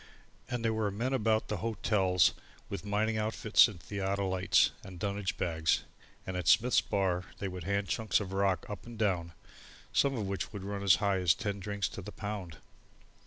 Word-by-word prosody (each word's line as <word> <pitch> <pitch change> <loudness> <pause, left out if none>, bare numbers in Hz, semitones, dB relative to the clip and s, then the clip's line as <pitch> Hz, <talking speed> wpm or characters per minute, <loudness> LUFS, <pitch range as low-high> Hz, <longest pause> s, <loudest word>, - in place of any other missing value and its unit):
And 120 -2 -2
there 110 - +2
were 110 -2 0
men 120 +7 -2
about 110 -3 +1
the 105 - -2
hotels 95 -4 +2 0.4
with - - -5
mining 105 +2 0
outfits 110 +1 +4
and 105 -6 -9
theodolites 95 0 +1
and 95 -2 -10
dunnage 100 0 -2
bags, 80 -2 +1 0.4
and 95 - -4
at 90 -3 -3
Smith's 110 +9 +5
bar 95 -3 0
they 100 - -3
would 90 -3 -6
hand 100 +1 0
chunks 110 +7 +1
of 95 -2 -5
rock 95 -3 +1
up 105 +3 -7
and 120 -1 -9
down, 90 -6 0 0.6
some 140 -1 +3
of 105 - -2
which 95 0 -3
would 100 -3 -7
run 100 0 -4
as 100 -1 +6
high 100 -2 +1
as 90 -4 +4
ten 100 -4 -3
drinks 100 -1 -2
to - - -7
the - - -8
pound. 100 -6 -6
100 Hz, 185 wpm, -31 LUFS, 95-110 Hz, 0.6 s, as